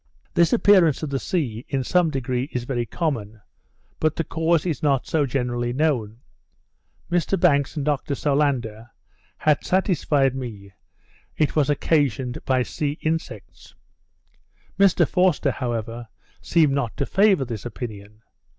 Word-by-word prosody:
This 170 Hz, -1 st, +3 dB
appearance 190 Hz, -, +4 dB
of 150 Hz, -, -3 dB
the 135 Hz, -, -1 dB
sea, 125 Hz, -11 st, -2 dB
in 135 Hz, -2 st, -1 dB
some 180 Hz, +3 st, +2 dB
degree, 130 Hz, -1 st, -2 dB
is 125 Hz, -, -3 dB
very 120 Hz, -2 st, -2 dB
common; 110 Hz, -11 st, -3 dB, 0.6 s
but 155 Hz, 0 st, +1 dB
the 165 Hz, -, -1 dB
cause 165 Hz, +1 st, 0 dB
is 160 Hz, -7 st, -2 dB
not 140 Hz, -3 st, +1 dB
so 150 Hz, -3 st, 0 dB
generally 120 Hz, -2 st, -2 dB
known. 125 Hz, -6 st, -1 dB, 0.9 s
Mr 175 Hz, +2 st, +1 dB
Banks 145 Hz, -5 st, +2 dB
and 145 Hz, -3 st, -3 dB
Dr 145 Hz, -1 st, -1 dB
Solander 130 Hz, -7 st, -1 dB, 0.5 s
had 150 Hz, -2 st, +2 dB
satisfied 150 Hz, -8 st, +1 dB
me 110 Hz, -7 st, -7 dB, 0.7 s
that 155 Hz, -, +2 dB
it -, -, -12 dB
was 150 Hz, -2 st, +2 dB
occasioned 135 Hz, -5 st, 0 dB
by 130 Hz, -1 st, +2 dB
sea 145 Hz, +3 st, -3 dB
insects. 160 Hz, +1 st, -5 dB, 1.0 s
Mr 195 Hz, -2 st, +4 dB
Forster, 180 Hz, -6 st, +2 dB
however, 120 Hz, -2 st, -4 dB, 0.3 s
seemed 155 Hz, -5 st, +2 dB
not 135 Hz, -5 st, -2 dB
to 140 Hz, -, 0 dB
favour 195 Hz, -6 st, +3 dB
this 115 Hz, -4 st, -6 dB
opinion. 105 Hz, -1 st, -8 dB
140 Hz, 140 wpm, -23 LUFS, 120-160 Hz, 1.0 s, appearance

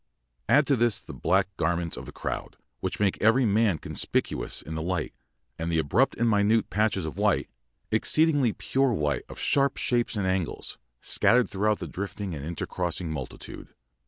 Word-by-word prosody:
_] -, -, -54 dB, 0.5 s
Add 140 Hz, +5 st, +5 dB
to 140 Hz, -, +3 dB
this 120 Hz, -3 st, +2 dB
the -, -, -10 dB
black 95 Hz, +1 st, +1 dB
garments 85 Hz, 0 st, -1 dB
of -, -, -8 dB
the -, -, -7 dB
crowd, -, -, -5 dB, 0.2 s
which -, -, -3 dB
make 100 Hz, -2 st, +1 dB
every 115 Hz, +4 st, +4 dB
man 105 Hz, -4 st, +3 dB
conspicuous -, -, -1 dB
in 80 Hz, -, -7 dB
the 80 Hz, -, -3 dB
light, 85 Hz, -1 st, -2 dB, 0.5 s
and 85 Hz, +1 st, -2 dB
the 80 Hz, -, +1 dB
abrupt 90 Hz, -, +2 dB
and 115 Hz, -, +1 dB
minute 105 Hz, 0 st, +2 dB
patches 100 Hz, -4 st, +1 dB
of 80 Hz, -, -6 dB
white -, -, +1 dB, 0.4 s
exceedingly 145 Hz, +3 st, +3 dB
pure 135 Hz, +3 st, 0 dB
white 75 Hz, -, -1 dB
of -, -, -10 dB
sharp 140 Hz, -1 st, +1 dB
shapes 120 Hz, -1 st, 0 dB
and 100 Hz, -2 st, -1 dB
angles 95 Hz, -3 st, -2 dB, 0.2 s
scattered 125 Hz, 0 st, +3 dB
throughout 105 Hz, +1 st, +1 dB
the -, -, -6 dB
drifting 100 Hz, -1 st, -5 dB
and 70 Hz, -3 st, -6 dB
intercrossing 85 Hz, +1 st, -3 dB
multitude. 80 Hz, -, -8 dB
100 Hz, 175 wpm, -27 LUFS, 85-115 Hz, 0.5 s, Add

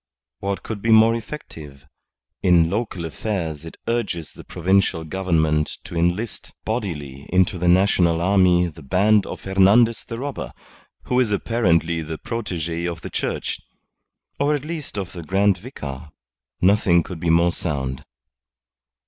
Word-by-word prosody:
What 100 Hz, 0 st, -3 dB
could 110 Hz, -3 st, -5 dB
be 115 Hz, -, -1 dB
more 110 Hz, +1 st, +7 dB
effective? 80 Hz, -, -8 dB, 0.6 s
In 85 Hz, -2 st, +4 dB
local 100 Hz, -5 st, -2 dB
affairs 80 Hz, -3 st, -3 dB
it 80 Hz, -, -10 dB
urges 105 Hz, -9 st, -2 dB
the -, -, -12 dB
Provincial 90 Hz, -1 st, +1 dB
Government 80 Hz, -3 st, 0 dB
to -, -, -9 dB
enlist 90 Hz, +7 st, -1 dB
bodily 75 Hz, -, -4 dB
into 95 Hz, 0 st, +2 dB
the 90 Hz, -, 0 dB
national 90 Hz, -2 st, +4 dB
army 90 Hz, -1 st, +4 dB
the 80 Hz, -2 st, -8 dB
band 100 Hz, +8 st, +3 dB
of -, -, -7 dB
Hernandez 100 Hz, +5 st, +4 dB
the 115 Hz, -, -7 dB
Robber 140 Hz, +2 st, -5 dB, 0.5 s
who 125 Hz, -, +1 dB
is 120 Hz, -5 st, +2 dB
apparently 85 Hz, -7 st, +1 dB
the 80 Hz, 0 st, -5 dB
protege 85 Hz, -8 st, -4 dB
of 85 Hz, -1 st, -5 dB
the -, -, -7 dB
Church -, -, -2 dB, 0.8 s
or 145 Hz, +1 st, +2 dB
at 145 Hz, 0 st, -5 dB
least 155 Hz, -8 st, -5 dB
of 95 Hz, -3 st, -4 dB
the 85 Hz, -, -7 dB
Grand 95 Hz, +3 st, +2 dB
Vicar. 75 Hz, -, -8 dB, 0.5 s
Nothing 90 Hz, -3 st, +4 dB
could 90 Hz, -1 st, -8 dB
be 85 Hz, -, -1 dB
more 85 Hz, +1 st, +4 dB
sound." 65 Hz, -7 st, -3 dB
90 Hz, 145 wpm, -22 LUFS, 80-105 Hz, 0.8 s, more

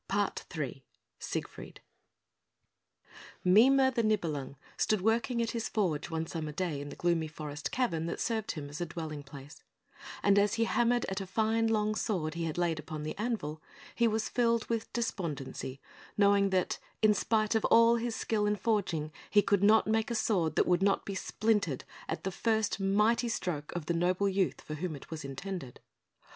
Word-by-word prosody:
PART -, -, -1 dB
III -, -, -4 dB, 0.4 s
SIEGFRIED -, -, -6 dB, 1.6 s
Mime 225 Hz, +9 st, +6 dB, 0.2 s
the 240 Hz, -, +1 dB
Nibelung 165 Hz, -11 st, -1 dB, 0.2 s
stood 215 Hz, -3 st, +1 dB
working 235 Hz, +3 st, +1 dB
at 230 Hz, -, -2 dB
his 230 Hz, -2 st, -3 dB
forge 180 Hz, -9 st, -1 dB
one 160 Hz, 0 st, -2 dB
summer 155 Hz, -2 st, -4 dB
day 155 Hz, -3 st, -2 dB
in 145 Hz, -, -6 dB
the -, -, -8 dB
gloomy 170 Hz, -2 st, +1 dB
forest 150 Hz, -1 st, -6 dB
cavern 170 Hz, -11 st, 0 dB
that 170 Hz, -, -4 dB
served 220 Hz, -2 st, -1 dB
him 150 Hz, -4 st, -6 dB
as 145 Hz, +4 st, -7 dB
a 175 Hz, -, -1 dB
dwelling 160 Hz, -3 st, -5 dB
place; 140 Hz, +1 st, -12 dB, 0.6 s
and 200 Hz, 0 st, +5 dB
as 205 Hz, +2 st, +2 dB
he 230 Hz, -, +2 dB
hammered 240 Hz, +1 st, +2 dB
at 190 Hz, +1 st, -3 dB
a 190 Hz, -, -6 dB
fine 225 Hz, +3 st, +1 dB
long 215 Hz, -1 st, +1 dB
sword 180 Hz, -8 st, -1 dB
he 170 Hz, 0 st, -3 dB
had 160 Hz, 0 st, -3 dB
laid 170 Hz, -3 st, 0 dB
upon 155 Hz, 0 st, -6 dB
the 155 Hz, -, -4 dB
anvil, 210 Hz, -10 st, -2 dB, 0.3 s
he 235 Hz, -, +3 dB
was 220 Hz, 0 st, 0 dB
filled 235 Hz, -2 st, +1 dB
with 230 Hz, -1 st, -2 dB
despondency, 150 Hz, -, -4 dB, 0.4 s
knowing 200 Hz, -1 st, +4 dB
that, 185 Hz, -2 st, 0 dB, 0.2 s
in 215 Hz, -1 st, +6 dB
spite 215 Hz, +1 st, +1 dB
of 220 Hz, -, +1 dB
all 230 Hz, +1 st, +6 dB
his 235 Hz, 0 st, -2 dB
skill 210 Hz, -2 st, 0 dB
in 210 Hz, -, +2 dB
forging, 185 Hz, -8 st, -1 dB, 0.2 s
he 205 Hz, -1 st, +5 dB
could 200 Hz, -2 st, +2 dB
not 215 Hz, +2 st, +5 dB
make 220 Hz, +1 st, +1 dB
a 235 Hz, -, -1 dB
sword 180 Hz, -8 st, +1 dB
that -, -, +3 dB
would 180 Hz, 0 st, +2 dB
not 195 Hz, 0 st, +2 dB
be 200 Hz, -, -4 dB
splintered 200 Hz, -, 0 dB, 0.3 s
at -, -, -3 dB
the 190 Hz, -, -2 dB
first 220 Hz, +1 st, 0 dB
mighty 210 Hz, +5 st, +2 dB
stroke 155 Hz, -9 st, -3 dB
of 175 Hz, -3 st, -3 dB
the 170 Hz, -, 0 dB
noble 180 Hz, +4 st, +1 dB
youth 190 Hz, -2 st, 0 dB
for 155 Hz, -, -7 dB
whom 160 Hz, +1 st, -3 dB
it 140 Hz, -, -12 dB
was 160 Hz, -1 st, -5 dB
intended. 140 Hz, 0 st, -6 dB
195 Hz, 185 wpm, -31 LUFS, 160-220 Hz, 1.6 s, Mime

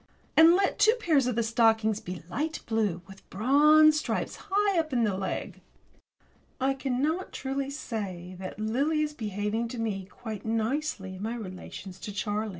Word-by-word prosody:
And 325 Hz, +2 st, +8 dB
let 390 Hz, +1 st, +1 dB
two 440 Hz, +2 st, +6 dB
pairs 305 Hz, -, +2 dB
of 250 Hz, -, 0 dB
the 235 Hz, -, +1 dB
stockings 225 Hz, -2 st, +3 dB
be 180 Hz, -5 st, -7 dB
light 305 Hz, -, -3 dB
blue, 210 Hz, -6 st, -1 dB
with 195 Hz, 0 st, -15 dB
bronze 300 Hz, +8 st, +5 dB
stripes -, -, -3 dB
high 400 Hz, -2 st, +2 dB
up 320 Hz, -1 st, -1 dB
the 265 Hz, -, -3 dB, 0.2 s
leg. 190 Hz, 0 st, -4 dB, 1.0 s
I 265 Hz, +1 st, +2 dB
cannot 275 Hz, +7 st, -1 dB
truly 270 Hz, 0 st, -3 dB
say 195 Hz, -, -5 dB
that 185 Hz, 0 st, -7 dB
Lily 275 Hz, +9 st, +1 dB
is 300 Hz, 0 st, -3 dB
behaving 210 Hz, -1 st, -2 dB
to 240 Hz, -, -7 dB
me 205 Hz, -4 st, -2 dB
quite 215 Hz, +1 st, -8 dB
nicely 225 Hz, -3 st, -2 dB
in -, -, -10 dB
my 225 Hz, +3 st, -2 dB
relations 190 Hz, -2 st, -8 dB
with 205 Hz, -, -6 dB
Charlie. 210 Hz, +1 st, -1 dB
230 Hz, 160 wpm, -28 LUFS, 205-295 Hz, 1.0 s, And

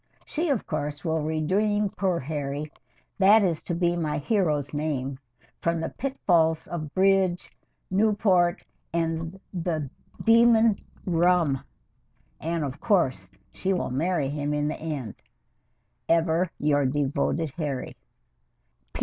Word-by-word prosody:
She, 330 Hz, +1 st, -2 dB
of 270 Hz, -7 st, 0 dB
course, 150 Hz, +1 st, -4 dB
will 160 Hz, -1 st, 0 dB
redeem 195 Hz, +7 st, +1 dB
poor 180 Hz, -2 st, 0 dB
Harry 145 Hz, +1 st, -4 dB, 0.5 s
that 205 Hz, +3 st, +6 dB
is 170 Hz, -4 st, 0 dB
to 175 Hz, -, -3 dB
be 175 Hz, 0 st, +1 dB
my 160 Hz, -3 st, -1 dB
hero's 150 Hz, -4 st, 0 dB
name 140 Hz, -3 st, -2 dB, 0.4 s
from 170 Hz, 0 st, 0 dB
the -, -, -2 dB
pitfalls 170 Hz, -, +1 dB
of 155 Hz, -4 st, -5 dB
bridge, 190 Hz, -2 st, +2 dB, 0.4 s
Newport, 195 Hz, -3 st, +2 dB, 0.3 s
and 165 Hz, +2 st, -2 dB
the 160 Hz, -6 st, -2 dB, 0.3 s
demon 230 Hz, -1 st, +5 dB, 0.3 s
Rum. 170 Hz, -5 st, +2 dB, 0.8 s
And, 165 Hz, 0 st, -2 dB
of 140 Hz, 0 st, -5 dB
course, 190 Hz, -, +1 dB, 0.2 s
she 190 Hz, +1 st, -1 dB
will 180 Hz, -, -2 dB
marry 155 Hz, +1 st, 0 dB
him 145 Hz, 0 st, -2 dB
in 150 Hz, 0 st, 0 dB
the 155 Hz, -, -3 dB
end. 145 Hz, -9 st, -5 dB, 0.9 s
Ever 165 Hz, +1 st, +2 dB
your 145 Hz, -2 st, +2 dB
devoted 145 Hz, +3 st, 0 dB
HARRY. 140 Hz, -4 st, -4 dB
165 Hz, 120 wpm, -26 LUFS, 150-185 Hz, 0.9 s, that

